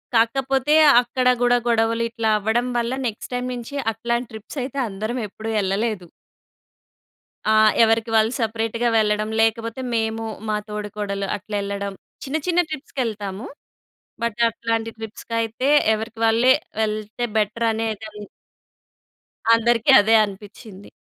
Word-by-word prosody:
కాకపోతే 265 +5 +2 0.3
అక్కడ 250 +1 -1
గూడా 245 0 +4
గొడవలు 230 0 +2
ఇట్లా 230 -1 -1
అవ్వడం 230 +4 0
వల్ల 235 +1 -1 0.2
నెక్స్ట్ 225 +2 -7
టైమ్ 250 0 -2
నించి 240 +3 -7 0.2
అట్లాం 235 +2 -1
ట్రిప్సయితే 255 +5 -6
అందరం 215 +6 -4
ఎప్పుడు 220 +3 -7
యెళ్ళలేదు. 200 -1 -1 1.4
ఆ! - - +5 0.3
ఎవరికి 225 +1 +2
వాళ్ళు 220 +1 +4
సపరేట్‌గా 225 +1 -1
వెళ్ళడం, 215 0 +1
లేకపోతే 230 +2 0
మేము 225 0 -1 0.3
మా 210 - +1
తోడుకోడలు 205 -1 -4
అట్లెళ్ళడం. 200 0 -4 0.3
చిన్న, 275 +4 -1
చిన్న 355 0 +2
ట్రిప్స్‌కెళ్తాము, 225 -8 -4 0.8
బట్ 235 -1 -2
అట్లాంటి 225 0 -2
ట్రిప్స్‌కైతే 230 +3 -3 0.3
ఎవరికి 225 +1 -6
వాళ్ళే 230 +3 +5 0.3
వెళ్తే 215 +2 -3
బెటరనేదన్ 220 -1 -2 1.4
అందరికి 230 0 +2
అదే 220 +2 +4
అనిపిచ్చింది. 205 0 -12
225 Hz, 110 wpm, -22 LUFS, 210-235 Hz, 1.4 s, ఆ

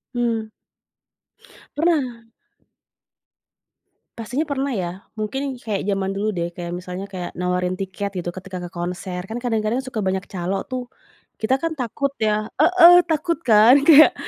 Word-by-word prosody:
Mmm. 230 -2 -1 1.3
Pernah. 260 -8 0 1.9
Pastinya 250 +7 -2
pernah 275 -1 -1
ya, 175 -3 -2 0.3
mungkin 265 +6 -3
kayak 205 -4 -3
jaman 195 -1 0
dulu 210 +2 -1
deh, 170 0 -2
kayak 175 -1 -5
misalnya 180 +2 -6
kayak, 180 -3 -6
nawarin 180 0 -1
tiket 195 +1 -3
gitu, 175 0 -4
ketika 185 0 -7
ke - - -7
konser, 180 +1 -4
kan 225 - -4
kadang-kadang 225 0 0
suka 230 -4 -4
banyak 190 0 -1
calo 190 +1 -3
tuh. 255 -2 -5 0.5
Kita 255 +5 +2
kan, 330 - -1
takut 275 +1 -2
ya 215 0 +1
heeh, 350 +1 +8 0.2
takut 330 +1 0
kan 230 +3 +6
kayak, 310 0 +8
215 Hz, 140 wpm, -22 LUFS, 185-260 Hz, 1.9 s, heeh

